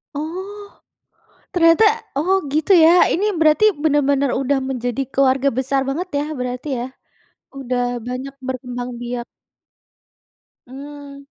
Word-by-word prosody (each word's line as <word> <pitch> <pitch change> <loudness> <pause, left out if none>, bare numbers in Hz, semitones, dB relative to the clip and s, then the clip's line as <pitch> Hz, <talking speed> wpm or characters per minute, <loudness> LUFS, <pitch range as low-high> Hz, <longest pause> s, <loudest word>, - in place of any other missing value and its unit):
Oh, 380 +7 -6 0.8
ternyata? 330 +3 +4 0.3
Oh 370 +7 +2
gitu 310 +5 +1
ya, 330 -3 +7 0.2
ini 385 +5 0
berarti 315 +6 +4 0.2
benar-benar 280 -3 +2
udah 275 +1 +1
menjadi 245 -1 -2
keluarga 275 0 +2
besar 270 +1 0
banget 340 +7 -3
ya - - -1 0.2
berarti 250 +2 -4
ya? 240 - -3 0.7
Udah 250 -2 -2 0.3
banyak 255 +2 -5
berkembang 250 -1 -5
biak. 240 0 -4 1.4
Mmm. 280 +1 -10
280 Hz, 110 wpm, -20 LUFS, 255-315 Hz, 1.4 s, ya